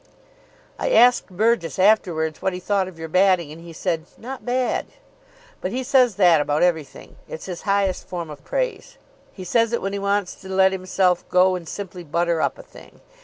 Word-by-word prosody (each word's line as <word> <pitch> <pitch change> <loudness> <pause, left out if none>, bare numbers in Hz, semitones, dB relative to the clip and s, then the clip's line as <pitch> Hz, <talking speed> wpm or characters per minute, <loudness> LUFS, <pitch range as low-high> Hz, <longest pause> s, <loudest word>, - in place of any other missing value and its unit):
"I - - -1
asked 250 - +5
Burgess 205 -2 0
afterwards 175 -6 +2
what 190 -1 0
he 180 - -5
thought 195 0 0
of 185 -3 -11
your 160 0 -6
batting, 185 -2 +2
and 160 +2 -11
he 170 0 -11
said, 160 0 -2
'Not 260 +3 -8
bad.' 250 0 0 0.7
But - - -2
he 260 +1 -2
says 255 -4 +3
that 175 -6 +5
about 145 +2 0
everything. 160 -5 -2
It's 160 - -7
his 180 -2 -6
highest 195 -2 0
form 170 -3 -5
of 140 -2 -11
praise. - - -3 0.3
He 185 - -10
says 230 +5 +1
it 235 - 0
when 195 0 -2
he 200 - -2
wants 200 -1 0
to 190 - -11
let 190 0 +4
himself 185 -1 0
go 185 +1 +4
and 175 -3 -5
simply 185 -3 -7
butter 170 +1 0
up - - -1
a - - -11
thing. - - -17
185 Hz, 195 wpm, -22 LUFS, 170-205 Hz, 0.7 s, asked